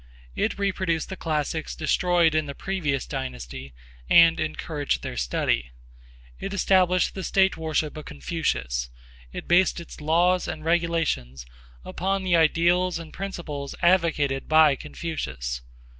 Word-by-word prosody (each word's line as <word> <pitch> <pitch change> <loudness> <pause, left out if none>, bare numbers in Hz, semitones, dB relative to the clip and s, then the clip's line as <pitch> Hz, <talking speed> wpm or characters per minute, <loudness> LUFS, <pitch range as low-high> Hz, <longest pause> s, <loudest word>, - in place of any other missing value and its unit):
It - - -1
reproduced 185 -5 -1
the 190 - -5
classics 155 -2 -2
destroyed 170 0 +2
in 155 -1 +1
the 140 - -6
previous 155 -9 -2
dynasty 65 +2 -6 0.4
and 165 -1 +6
encouraged 155 -1 -2
their - - -5
study; - - 0 0.7
it 200 +1 -4
established 185 -2 +3
the 190 - -6
state 190 +1 +3
worship 155 -1 -2
of 155 - -8
Confucius; 60 -2 -2 0.4
it - - -7
based 175 +1 +3
its 170 -2 -10
laws 175 +4 +2
and 155 - -6
regulations 165 - 0 0.4
upon 195 +2 -2
the 180 -2 +2
ideals 170 +3 +3
and 165 -2 -10
principles 165 -8 -5
advocated 160 -7 +2
by 155 -2 +6
Confucius. 65 - -5
160 Hz, 130 wpm, -25 LUFS, 140-180 Hz, 0.7 s, and